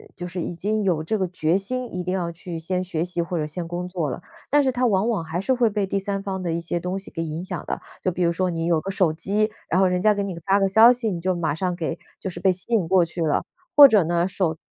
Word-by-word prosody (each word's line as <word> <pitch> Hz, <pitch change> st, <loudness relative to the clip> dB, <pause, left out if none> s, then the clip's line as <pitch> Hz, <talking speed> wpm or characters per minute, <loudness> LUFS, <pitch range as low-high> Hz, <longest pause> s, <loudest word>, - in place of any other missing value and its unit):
就 175 Hz, -, -6 dB
是 180 Hz, 0 st, -4 dB
已 175 Hz, -, -4 dB
经 215 Hz, +4 st, -1 dB
有 170 Hz, -5 st, +1 dB
这 215 Hz, +7 st, -1 dB
个 190 Hz, -, 0 dB
决 170 Hz, 0 st, +1 dB
心， 250 Hz, +4 st, -3 dB
一 180 Hz, -, -2 dB
定 180 Hz, +1 st, -2 dB
要 175 Hz, -3 st, -2 dB
去 170 Hz, 0 st, -7 dB
先 180 Hz, +3 st, -1 dB
学 170 Hz, -3 st, -2 dB
习 175 Hz, -1 st, -2 dB
或 170 Hz, +1 st, -3 dB
者 155 Hz, -, -1 dB
先 165 Hz, +3 st, -5 dB
工 175 Hz, +1 st, -4 dB
作 170 Hz, -6 st, -2 dB
了， -, -, -5 dB, 0.3 s
但 290 Hz, +1 st, +4 dB
是 260 Hz, -, +2 dB
他 250 Hz, 0 st, 0 dB
往 210 Hz, +1 st, +2 dB
往 205 Hz, -8 st, 0 dB
还 165 Hz, +3 st, -3 dB
是 260 Hz, -, +1 dB
会 240 Hz, -3 st, +3 dB
被 205 Hz, -1 st, -1 dB
第 195 Hz, +1 st, -1 dB
三 195 Hz, 0 st, -3 dB
方 190 Hz, -2 st, -3 dB
的 170 Hz, -2 st, -2 dB
一 170 Hz, -, -2 dB
些 170 Hz, +1 st, -2 dB
东 180 Hz, +2 st, -3 dB
西 195 Hz, -, -8 dB
给 165 Hz, -, -4 dB
影 160 Hz, +2 st, -4 dB
响 180 Hz, -4 st, -5 dB
的。 -, -, -4 dB, 0.2 s
就 185 Hz, -, 0 dB
比 175 Hz, +1 st, -1 dB
如 170 Hz, -, +3 dB
说 185 Hz, +2 st, 0 dB
你 165 Hz, -1 st, -2 dB
有 170 Hz, -2 st, +2 dB
个 190 Hz, -, -6 dB
手 185 Hz, -4 st, +2 dB
机， 210 Hz, +6 st, 0 dB, 0.2 s
然 185 Hz, +3 st, +3 dB
后 -, -, +5 dB
人 180 Hz, 0 st, 0 dB
家 215 Hz, +2 st, +5 dB
给 200 Hz, -1 st, -2 dB
你 185 Hz, -4 st, -5 dB
发 195 Hz, +1 st, +4 dB
个 195 Hz, -1 st, +2 dB
消 225 Hz, +5 st, +7 dB
息， 230 Hz, -4 st, -2 dB
你 170 Hz, -, -3 dB
就 185 Hz, +1 st, 0 dB
马 160 Hz, -4 st, -1 dB
上 180 Hz, +3 st, -2 dB
给 165 Hz, -1 st, -3 dB, 0.2 s
就 190 Hz, -, -3 dB
是 -, -, -7 dB
被 190 Hz, -1 st, +3 dB
吸 185 Hz, +6 st, -4 dB
引 190 Hz, -7 st, +2 dB
过 185 Hz, 0 st, +4 dB
去 170 Hz, +1 st, -5 dB
了。 150 Hz, -, +1 dB, 0.3 s
或 290 Hz, -1 st, +11 dB
者 210 Hz, -7 st, +4 dB
呢 170 Hz, +2 st, +1 dB
手 175 Hz, -4 st, -1 dB
180 Hz, 320 characters per minute, -23 LUFS, 170-200 Hz, 0.3 s, 或